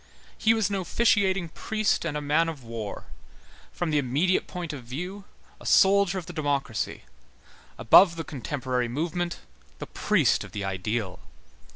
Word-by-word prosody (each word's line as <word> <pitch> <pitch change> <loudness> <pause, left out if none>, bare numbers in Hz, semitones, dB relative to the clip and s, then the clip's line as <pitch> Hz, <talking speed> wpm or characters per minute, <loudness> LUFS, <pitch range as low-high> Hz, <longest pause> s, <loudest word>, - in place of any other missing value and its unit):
He 225 0 +3
was 220 -4 +1
an 200 - 0
officiating 190 -2 +1
priest 215 +3 -1
and 150 -3 -2
a - - -3
man 155 +3 +2
of 150 -6 -8
war; 115 -3 -6 0.7
from 175 -2 -3
the 150 - +3
immediate 145 +8 +1
point 175 -3 -5
of 135 -4 -8
view, 180 +11 -6 0.3
a - - -14
soldier 195 -1 +4
of 180 - -5
the 175 - -9
democracy; 145 - -2 0.7
above 175 - +6
the 165 - -4
contemporary 130 -3 -3
movement, 170 +7 -3 0.4
the - - -6
priest - - +1
of - - -12
the 100 - -4
ideal. 95 +1 -3
160 Hz, 155 wpm, -26 LUFS, 125-185 Hz, 0.7 s, above